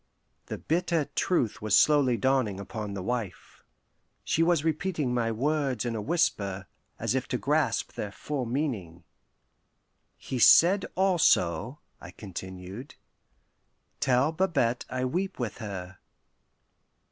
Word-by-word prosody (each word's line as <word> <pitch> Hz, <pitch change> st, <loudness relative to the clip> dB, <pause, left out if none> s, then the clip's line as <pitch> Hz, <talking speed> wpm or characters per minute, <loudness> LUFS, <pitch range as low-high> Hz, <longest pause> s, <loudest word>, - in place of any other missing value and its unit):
The -, -, -4 dB
bitter 170 Hz, -1 st, 0 dB
truth 125 Hz, -, 0 dB
was 105 Hz, -2 st, +3 dB
slowly 140 Hz, -5 st, +4 dB
dawning 130 Hz, -7 st, +1 dB
upon 100 Hz, 0 st, -6 dB
the 95 Hz, -, -5 dB
wife. 115 Hz, -3 st, -5 dB, 0.6 s
She 165 Hz, -, 0 dB
was 165 Hz, -2 st, +3 dB
repeating 160 Hz, -4 st, -1 dB
my 115 Hz, -2 st, 0 dB
words 135 Hz, -1 st, -1 dB
in 120 Hz, -1 st, -2 dB
a 110 Hz, -, -3 dB
whisper, 100 Hz, -, 0 dB, 0.3 s
as -, -, -1 dB
if 130 Hz, -1 st, -1 dB
to 125 Hz, -, -1 dB
grasp 145 Hz, -2 st, 0 dB
their 105 Hz, -, -5 dB
full 135 Hz, +3 st, -4 dB
meaning. 110 Hz, -, -3 dB, 1.1 s
"He 130 Hz, -, -5 dB
said 185 Hz, -, +6 dB
also," 150 Hz, -, +2 dB, 0.2 s
I -, -, -10 dB
continued, 95 Hz, -, -8 dB, 1.0 s
"'Tell 130 Hz, +4 st, +2 dB
Babette 160 Hz, -9 st, 0 dB
I 130 Hz, 0 st, -2 dB
weep 185 Hz, +9 st, -2 dB
with 120 Hz, -3 st, -4 dB
her. 95 Hz, -4 st, -7 dB
125 Hz, 125 wpm, -28 LUFS, 105-155 Hz, 1.1 s, said